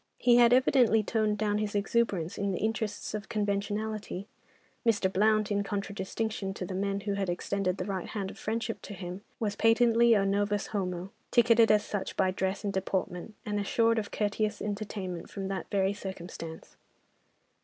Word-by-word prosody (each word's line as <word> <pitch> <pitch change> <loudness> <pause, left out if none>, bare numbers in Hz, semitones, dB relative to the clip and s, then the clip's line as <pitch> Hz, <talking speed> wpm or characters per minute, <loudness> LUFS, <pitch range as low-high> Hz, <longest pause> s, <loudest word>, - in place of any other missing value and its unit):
He 240 -1 +5
had 240 -1 +7
evidently 245 -3 +5
toned 215 -1 +1
down 210 0 +1
his 210 -1 -2
exuberance 200 -5 0
in 200 -1 -1
the - - -1
interests 220 -2 -2
of 210 -1 -5
conventionality. 205 -1 -2 0.6
Mr. 205 -5 +2
Blount, 215 +1 +3
in 205 0 +2
contradistinction 200 0 -3
to 185 - -4
the 185 - -5
men 200 +1 -1
who 200 0 -2
had 195 -2 -1
extended 185 +1 -1
the 180 - -3
right 190 -3 -3
hand 195 -2 -4
of - - -14
friendship 225 +1 -2
to 205 - -8
him, 180 +1 -6 0.2
was 210 -3 -1
patently 230 +1 +5
a 200 -1 +3
novus 205 +1 +1
homo—ticketed 210 +4 +2
as 210 0 +3
such 205 -2 -4
by 185 - +3
dress 190 +2 -2
and 200 -1 -1
deportment, 190 +1 -2
and 210 -1 -1
assured 230 +3 +2
of 205 - -4
courteous 210 0 -1
entertainment 200 -4 -4
from 195 -1 -5
that 195 -1 -4
very 195 0 +2
circumstance. 175 -4 -8
205 Hz, 165 wpm, -30 LUFS, 195-220 Hz, 0.6 s, had